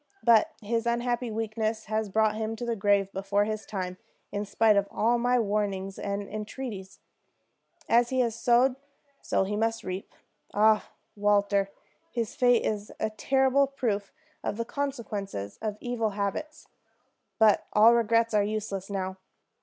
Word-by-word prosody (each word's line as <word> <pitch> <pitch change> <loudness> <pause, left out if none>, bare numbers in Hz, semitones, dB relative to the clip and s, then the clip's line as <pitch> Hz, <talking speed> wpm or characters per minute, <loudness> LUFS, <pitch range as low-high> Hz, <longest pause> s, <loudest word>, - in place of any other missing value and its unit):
But 235 +7 +5
his 230 +2 -1
unhappy 240 0 0
weakness 220 0 -2
has 215 0 -1
brought 215 +1 +2
him 220 +1 -3
to 240 - -5
the 235 -1 -1
grave 200 -1 +2
before 200 +1 +1
his 215 0 -4
time, 185 -3 -4 0.3
in 205 +1 -2
spite 215 +1 +3
of 200 0 +2
all 235 +2 +1
my 245 +1 +2
warnings, 200 -3 -1
and 200 0 -2
entreaties. 210 -2 -6 0.9
As 240 +1 +4
he 260 -1 +2
has 235 -2 0
sowed, 245 +2 +3 0.4
so 190 - +1
must 225 +3 -1
he - - -11
reap. 185 +1 -5 0.4
Ah, 215 +1 +4 0.3
Walter, 200 -1 +2 0.4
his 230 -3 -2
fate 245 -2 +4
is 210 -1 -2
a 220 - -1
terrible 265 +5 +2
proof 220 -7 -2 0.3
of 205 - -2
the 230 - -2
consequences 215 - -4
of 215 -2 -3
evil 240 -3 -1
habits. 210 +11 -4 0.7
But 220 -3 +4
all 220 +3 +7
regrets 230 0 +2
are 210 - +4
useless 205 -2 -3
now. 190 -1 -3
215 Hz, 150 wpm, -28 LUFS, 200-235 Hz, 0.9 s, all